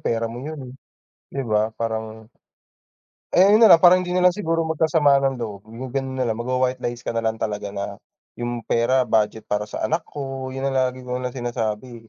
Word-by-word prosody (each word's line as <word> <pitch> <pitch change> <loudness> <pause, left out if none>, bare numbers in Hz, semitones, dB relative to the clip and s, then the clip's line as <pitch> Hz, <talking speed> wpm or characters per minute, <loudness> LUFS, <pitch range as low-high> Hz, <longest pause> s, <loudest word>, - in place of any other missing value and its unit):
pera 115 0 0
mo 120 +3 -7
yun, 155 +1 -6
eh, - - -13 0.6
'di 140 - -2
ba? 110 +1 +1
Parang 110 -1 -5 1.0
Eh, 180 - +6
yun 215 - +6
na 225 - +8
lang, 170 - +10
para 175 - +9
hindi 180 - -5
nalang 180 0 +5
siguro 165 -4 -1
magkasamaan 155 -3 +3
ng 135 -1 0
loob, 105 -5 -6
yung 120 +3 -8
ganun 135 -1 -3
na 130 - 0
lang, 115 - 0
mag 120 - -5
wa-white 130 0 0
lies 120 0 -4
ka - - -2
nalang 115 -1 -1
talaga 105 -2 -3
na, 100 0 -6 0.4
yung 120 -1 -3
pera 125 +2 +2
budget 110 -1 0
para 105 0 -2
sa - - -4
anak 160 +2 +1
ko, 135 -2 -5
yun 135 +1 -5
ang 135 - 0
lagi 130 -1 -1
ko 125 0 -3
lang 125 - -2
sinasabi, 115 -1 -4
125 Hz, 210 wpm, -22 LUFS, 110-135 Hz, 1.0 s, lang